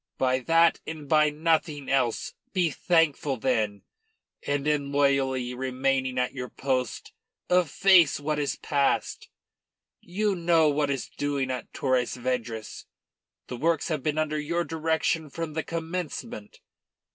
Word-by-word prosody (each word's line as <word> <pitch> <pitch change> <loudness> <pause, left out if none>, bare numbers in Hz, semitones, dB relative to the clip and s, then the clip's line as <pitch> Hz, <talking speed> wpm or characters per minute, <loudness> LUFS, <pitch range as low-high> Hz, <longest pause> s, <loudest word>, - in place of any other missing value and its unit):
By 130 0 +2
that 165 +5 +3
and 155 -2 -7
by 155 +1 +4
nothing 155 -2 0
else. 125 -4 0 0.2
Be 175 -4 +2
thankful, 160 -4 +1
then; 110 -5 -1 0.6
and 145 0 -2
in 145 -2 0
loyally 135 -3 +1
remaining 130 0 -1
at 125 0 0
your 125 -2 -5
post 130 -3 -2 0.4
efface 180 -2 +4
what 150 +1 -2
is 140 -3 -1
past. 140 -2 -1 0.7
You 205 +3 -1
know 170 -3 +3
what 145 0 0
is 135 -2 -2
doing 140 -2 -2
at 125 - -5
Torres 130 -2 0
Vedras. 120 -3 -4 0.6
The 125 - -7
works 165 +7 0
have 155 -4 -1
been 150 +2 -1
under 155 -1 0
your 170 +3 -1
direction 160 -1 -1
from 165 +1 -5
the 160 - -1
commencement. 165 - -5
145 Hz, 135 wpm, -27 LUFS, 130-160 Hz, 0.7 s, by